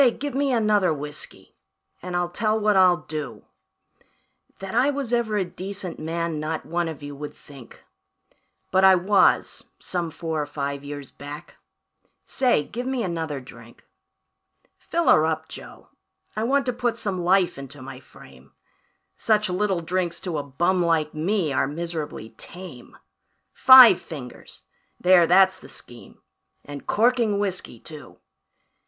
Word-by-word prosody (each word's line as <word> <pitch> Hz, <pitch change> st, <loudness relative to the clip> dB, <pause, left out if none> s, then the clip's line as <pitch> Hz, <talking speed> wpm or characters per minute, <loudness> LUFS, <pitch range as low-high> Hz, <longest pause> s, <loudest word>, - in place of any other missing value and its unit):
Give 290 Hz, 0 st, -4 dB
me 275 Hz, +1 st, 0 dB
another 210 Hz, -6 st, +2 dB
whiskey, 145 Hz, -1 st, -7 dB, 0.5 s
and 180 Hz, 0 st, -5 dB
I'll 175 Hz, 0 st, -1 dB
tell 215 Hz, +3 st, 0 dB
what 210 Hz, -1 st, +2 dB
I'll 180 Hz, -2 st, +4 dB
do 145 Hz, -9 st, -6 dB, 1.1 s
That 195 Hz, +1 st, -7 dB
I 250 Hz, +5 st, +3 dB
was 275 Hz, -4 st, -3 dB
ever 225 Hz, -3 st, +1 dB
a 190 Hz, -, 0 dB
decent 185 Hz, 0 st, -7 dB
man 165 Hz, 0 st, -3 dB
not 155 Hz, +1 st, -4 dB
one 170 Hz, 0 st, -1 dB
of 155 Hz, -2 st, -7 dB
you 145 Hz, 0 st, -7 dB
would 145 Hz, +1 st, -8 dB
think; 135 Hz, -5 st, -15 dB, 0.9 s
But 190 Hz, 0 st, +3 dB
I 190 Hz, 0 st, +8 dB
was, 195 Hz, +3 st, +2 dB
some 175 Hz, -2 st, -3 dB
four 160 Hz, -1 st, -4 dB
or 145 Hz, -, -4 dB
five 140 Hz, -1 st, -4 dB
years 145 Hz, -1 st, -8 dB
back. 145 Hz, +3 st, -10 dB, 0.7 s
Say, 250 Hz, -, +1 dB
give 245 Hz, -, -6 dB
me 260 Hz, -3 st, -1 dB
another 160 Hz, -6 st, -3 dB
drink. 120 Hz, -2 st, -15 dB, 0.9 s
"Fill 340 Hz, 0 st, -2 dB
her 155 Hz, -, +6 dB
up, 160 Hz, 0 st, -2 dB
Joe, -, -, -12 dB, 0.5 s
I 215 Hz, +1 st, -1 dB
want 275 Hz, +2 st, +1 dB
to 250 Hz, -, -1 dB
put 240 Hz, -1 st, -1 dB
some 195 Hz, -3 st, -3 dB
life 180 Hz, +1 st, +2 dB
into 140 Hz, +1 st, -9 dB
my 130 Hz, 0 st, -9 dB
frame 70 Hz, -, -17 dB, 0.6 s
Such 210 Hz, -3 st, +1 dB
little 190 Hz, -1 st, 0 dB
drinks 175 Hz, +1 st, -2 dB
to 170 Hz, -5 st, -3 dB
a -, -, -4 dB
bum 175 Hz, +7 st, 0 dB
like 160 Hz, -3 st, +1 dB
me 165 Hz, -1 st, -1 dB
are 135 Hz, -, +1 dB
miserably 155 Hz, -6 st, -5 dB
tame; 175 Hz, -9 st, -11 dB, 0.6 s
Five 260 Hz, -7 st, +9 dB
fingers 135 Hz, -6 st, -10 dB, 0.4 s
there, 180 Hz, -2 st, +5 dB
that's 190 Hz, +1 st, +5 dB
the -, -, -15 dB
scheme 120 Hz, -1 st, -13 dB, 0.4 s
and 145 Hz, -1 st, -9 dB
corking 230 Hz, -2 st, +2 dB
whiskey, 190 Hz, -, -4 dB
too. 155 Hz, +2 st, -12 dB
175 Hz, 150 wpm, -24 LUFS, 150-210 Hz, 1.1 s, Five